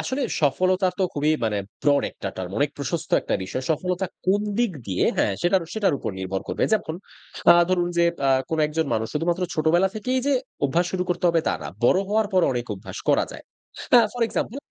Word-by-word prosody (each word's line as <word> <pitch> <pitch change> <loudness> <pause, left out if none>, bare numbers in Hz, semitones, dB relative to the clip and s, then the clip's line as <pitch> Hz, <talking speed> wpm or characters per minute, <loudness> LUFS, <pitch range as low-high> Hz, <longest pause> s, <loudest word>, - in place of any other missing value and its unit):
আসলে 265 +2 -2 0.2
সফলতা 185 +6 +2
তো - - +1
খুবই 150 +1 +1
মানে 105 -2 0 0.2
ব্রড 145 -1 +3
একটা - - -6
টার্ম, 90 -1 -5
অনেক 145 0 +2
প্রশস্ত 160 +3 -4
একটা - - -1
বিষয়। 130 +7 -4
সফলতা 180 +4 -1 0.2
কোন 195 +2 +3 0.2
দিক 240 -3 +2 0.2
দিয়ে 95 -2 0
হ্যাঁ, - - +2
সেটারও, 175 -1 +2
সেটার 210 -8 +2
উপর - - -3
নির্ভর 95 0 -3
করবে। - - -2
যেমন 195 -7 0 0.6
আ - - +5
ধরুন 175 -1 +1
যে, 170 - +5 0.2
আ - - +3 0.2
কোন 160 - -2
একজন 155 +1 -1
মানুষ, 110 0 0
শুধুমাত্র 170 +4 0
ছোটবেলা 170 +4 +3
থেকেই 250 +4 -1
যে, 285 - +3 0.3
অভ্যাস 165 +6 +1
শুরু 185 -1 0
করতে 180 - -2
হবে 170 -1 +3
তা - - +1
না। - - -5 0.2
বড় 185 - +5
হওয়ার 215 +1 +2
পরও 185 -2 +4
অনেক 120 -1 -3
অভ্যাস 95 - -9
করা - - +4
যায়। - - -11 0.5
হ্যাঁ, 235 -2 +7
ফর 245 - -2
এক্সাম্পল 225 +1 -3
170 Hz, 205 wpm, -24 LUFS, 145-190 Hz, 0.6 s, হ্যাঁ